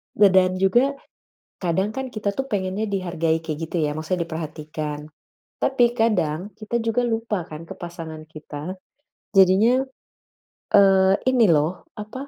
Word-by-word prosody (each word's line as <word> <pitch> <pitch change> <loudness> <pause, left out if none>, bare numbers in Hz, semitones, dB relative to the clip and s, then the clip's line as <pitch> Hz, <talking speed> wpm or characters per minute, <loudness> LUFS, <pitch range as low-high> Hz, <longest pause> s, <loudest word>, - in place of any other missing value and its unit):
Da 205 -1 +7
dan 185 -1 +4
juga 240 +9 +2 0.7
kadang 190 +4 0
kan 265 -1 -4
kita 205 -3 -3
tuh 270 +3 -4
pengennya 200 +1 -2
dihargai 170 -4 0
kayak 155 -2 -3
gitu 175 - -3
ya, 150 - -2
maksudnya 165 +3 -2
diperhatikan. 155 -2 -5 0.5
Tapi 265 -2 +2
kadang 205 -4 0
kita 215 +2 -2
juga 225 +1 +1
lupa 225 -6 -2
kan 155 +1 -8
ke - - -9
pasangan 165 -2 -8
kita. 155 +3 -7 0.6
Jadinya, 215 +8 +5 0.9
eee, 195 -1 +6 0.2
ini 240 -3 +4
loh 160 +2 +1
apa, 225 +6 -7
190 Hz, 135 wpm, -23 LUFS, 160-215 Hz, 0.9 s, Da